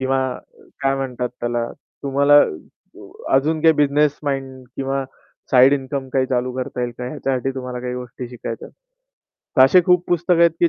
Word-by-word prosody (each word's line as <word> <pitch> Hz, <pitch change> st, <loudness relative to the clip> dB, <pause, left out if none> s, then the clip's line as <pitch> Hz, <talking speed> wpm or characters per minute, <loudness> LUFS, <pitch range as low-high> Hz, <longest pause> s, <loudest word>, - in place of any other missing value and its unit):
किंवा 130 Hz, 0 st, +1 dB, 0.6 s
काय 135 Hz, 0 st, +2 dB
म्हणतात 125 Hz, -2 st, -3 dB
त्याला, 120 Hz, 0 st, -1 dB, 0.4 s
तुम्हाला 140 Hz, +1 st, +4 dB, 1.0 s
अजून 155 Hz, +4 st, +2 dB
काही 160 Hz, -, +7 dB
बिझनेस 145 Hz, 0 st, +2 dB
माइंड 135 Hz, -2 st, -4 dB
किंवा 135 Hz, 0 st, -2 dB, 0.5 s
साइड 130 Hz, +1 st, +6 dB
इन्कम 135 Hz, -1 st, -2 dB
काही 130 Hz, -1 st, +2 dB
चालू 125 Hz, -1 st, -1 dB
करता 125 Hz, -1 st, -4 dB
येईल 120 Hz, -1 st, -2 dB
का? 125 Hz, -, -4 dB
ह्याच्यासाठी 135 Hz, -2 st, -2 dB
तुम्हाला 125 Hz, -1 st, -5 dB
काही 125 Hz, 0 st, -4 dB
गोष्टी 125 Hz, 0 st, -7 dB
शिकायच्यात. 120 Hz, -2 st, -7 dB, 0.9 s
तर 130 Hz, -, +8 dB
असे 180 Hz, +8 st, +6 dB
खूप 180 Hz, -1 st, +4 dB
पुस्तकं 175 Hz, 0 st, +2 dB
आहेत, 170 Hz, -, +6 dB
की 170 Hz, -, +5 dB
135 Hz, 155 wpm, -20 LUFS, 125-145 Hz, 1.0 s, तर